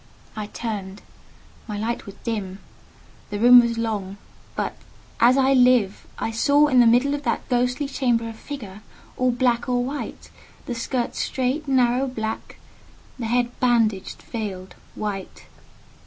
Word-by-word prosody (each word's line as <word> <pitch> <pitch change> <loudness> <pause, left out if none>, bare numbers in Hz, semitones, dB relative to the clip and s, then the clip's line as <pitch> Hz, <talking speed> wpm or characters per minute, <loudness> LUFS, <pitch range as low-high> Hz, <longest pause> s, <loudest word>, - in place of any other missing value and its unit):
I 215 -1 -4
turned: 205 -3 -5 0.6
my 210 -2 -4
light 225 +2 -3
was 200 - -9
dim; 205 -5 -3 0.7
the 205 - -3
room 245 +3 +9
was 235 -1 +1
long—but 205 -4 -5 0.4
as 245 +3 +5
I 270 0 +4
live! 250 -6 +3
I 225 - -2
saw 285 +6 +4
in 255 -2 +4
the 240 - +7
middle 250 +5 +4
of 290 - -2
that - - -2
ghostly 250 +3 +1
chamber 240 -4 0
a 225 - -6
figure 220 -5 -8 0.3
all 255 0 +1
black 240 -1 +1
and 245 -1 +1
white; 280 +3 -6 0.3
the 245 - -3
skirts 240 +1 -2
straight, 265 +4 -1
narrow, 255 0 +2
black; 220 -3 -5 0.6
the 230 - -2
head 240 +1 +1
bandaged, 225 -6 +1
veiled, 195 -5 -6 0.2
white. 200 -3 -5
235 Hz, 140 wpm, -23 LUFS, 215-255 Hz, 0.7 s, room